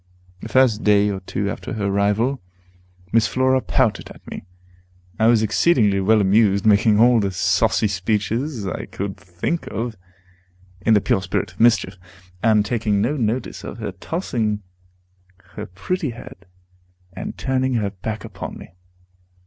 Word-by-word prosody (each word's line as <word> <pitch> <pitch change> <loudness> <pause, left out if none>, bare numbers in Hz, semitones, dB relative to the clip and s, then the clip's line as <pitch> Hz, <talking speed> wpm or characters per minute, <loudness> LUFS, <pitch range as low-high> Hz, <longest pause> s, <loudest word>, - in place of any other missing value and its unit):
The - - -8
first 130 -4 +3
day 105 0 +4
or 95 - -4
two 100 +2 -3
after - - -6
her 105 -3 -2
arrival, 105 +6 +1 0.7
Miss 115 -1 +3
Flora 130 0 +2
pouted 115 -6 0
at - - -15
me. - - -8 0.7
I 110 - +4
was 115 -2 +4
exceedingly 110 -4 +3
well 105 +3 +3
amused, 100 +1 +3
making 105 0 +4
all 120 0 +6
the 100 -2 0
saucy 95 +3 +2
speeches 105 - -2
I 95 - -4
could 100 0 -5
think 95 - -4
of, 115 0 -4 0.9
in 110 +2 +4
the 105 - +4
pure 95 - +1
spirit 95 +1 -2
of - - -23
mischief, 110 -5 +3 0.4
and 110 -2 +3
taking 105 -3 0
no 120 +9 0
notice 115 -5 -2
of 105 - -7
her 110 -3 -4
tossing 105 - -3 0.9
her 105 - -6
pretty 145 - -3
head, 115 -4 -11 0.7
and - - -6
turning 130 -1 0
her 105 -3 0
back 105 +3 -6
upon 100 -5 -7
me. - - -12
110 Hz, 150 wpm, -21 LUFS, 100-120 Hz, 0.9 s, all